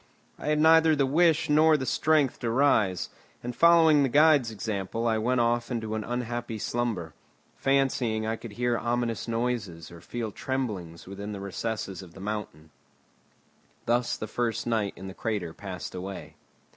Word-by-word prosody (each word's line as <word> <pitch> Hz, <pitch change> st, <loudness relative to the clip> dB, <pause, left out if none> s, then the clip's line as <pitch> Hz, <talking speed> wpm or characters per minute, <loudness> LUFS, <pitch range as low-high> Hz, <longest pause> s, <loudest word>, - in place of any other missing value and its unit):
I -, -, -6 dB
had 150 Hz, 0 st, +2 dB
neither 160 Hz, 0 st, +6 dB
the 140 Hz, -2 st, +2 dB
wish 165 Hz, +2 st, +3 dB
nor 155 Hz, +1 st, +5 dB
the 130 Hz, -, -4 dB
strength 150 Hz, -2 st, +2 dB
to 120 Hz, -, -2 dB
rise, 110 Hz, -8 st, +2 dB, 0.3 s
and 120 Hz, 0 st, -5 dB
following 165 Hz, -2 st, +6 dB
the 135 Hz, -, +2 dB
guide's 145 Hz, -3 st, +5 dB
example 110 Hz, 0 st, -3 dB
I 110 Hz, -1 st, +2 dB
went 120 Hz, +2 st, +1 dB
off 120 Hz, 0 st, +1 dB
into 110 Hz, -3 st, -3 dB
an 110 Hz, -1 st, -2 dB
unhappy 120 Hz, -1 st, -4 dB
slumber, 110 Hz, -8 st, -2 dB, 0.4 s
fancying 130 Hz, -5 st, +1 dB
I 110 Hz, +1 st, -1 dB
could 115 Hz, -2 st, -10 dB
hear 120 Hz, +1 st, 0 dB
ominous 120 Hz, -1 st, -2 dB
noises 115 Hz, -9 st, -3 dB
or 85 Hz, -1 st, -12 dB
feel 115 Hz, +2 st, -5 dB
tremblings 100 Hz, -11 st, -4 dB
within 100 Hz, +2 st, -7 dB
the 100 Hz, -, -6 dB
recesses 100 Hz, 0 st, -4 dB
of 85 Hz, -2 st, -14 dB
the -, -, -11 dB
mountain. 95 Hz, -7 st, -6 dB, 1.1 s
Thus 120 Hz, +1 st, +1 dB
the -, -, -4 dB
first 115 Hz, +1 st, -2 dB
night 110 Hz, -4 st, 0 dB
in 95 Hz, -, -10 dB
the 95 Hz, -, -7 dB
crater 100 Hz, -7 st, -3 dB
passed 95 Hz, -2 st, -7 dB
away. 95 Hz, +1 st, -7 dB
115 Hz, 165 wpm, -27 LUFS, 100-130 Hz, 1.1 s, neither